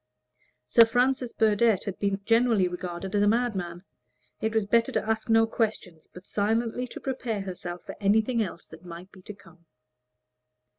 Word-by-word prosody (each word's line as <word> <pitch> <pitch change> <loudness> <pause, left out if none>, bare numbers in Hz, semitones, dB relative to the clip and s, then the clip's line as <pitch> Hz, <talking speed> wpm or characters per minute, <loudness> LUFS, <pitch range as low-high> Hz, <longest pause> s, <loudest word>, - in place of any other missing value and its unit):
Sir 180 - +7
Francis 250 +1 +1
Burdett 220 -1 +2
had 200 - -6
been 200 -1 -1
generally 230 -4 +3
regarded 180 +1 -6
as 205 - +2
a 205 - +3
madman. 195 -7 -1 0.6
It 220 0 -1
was 220 -2 +2
better 230 +3 +2
to - - -2
ask 220 +1 -1
no 225 0 +5
questions, 210 -8 -3
but 180 +1 -13
silently 225 +4 -1
to - - -9
prepare 250 -6 -3
herself 180 -2 -7
for - - -8
anything 220 +4 +2
else 180 -5 -5
there - - -14
might 180 +2 -10
be 190 - -16
to 210 - -9
come. 170 -3 -20
210 Hz, 165 wpm, -27 LUFS, 185-230 Hz, 0.6 s, Sir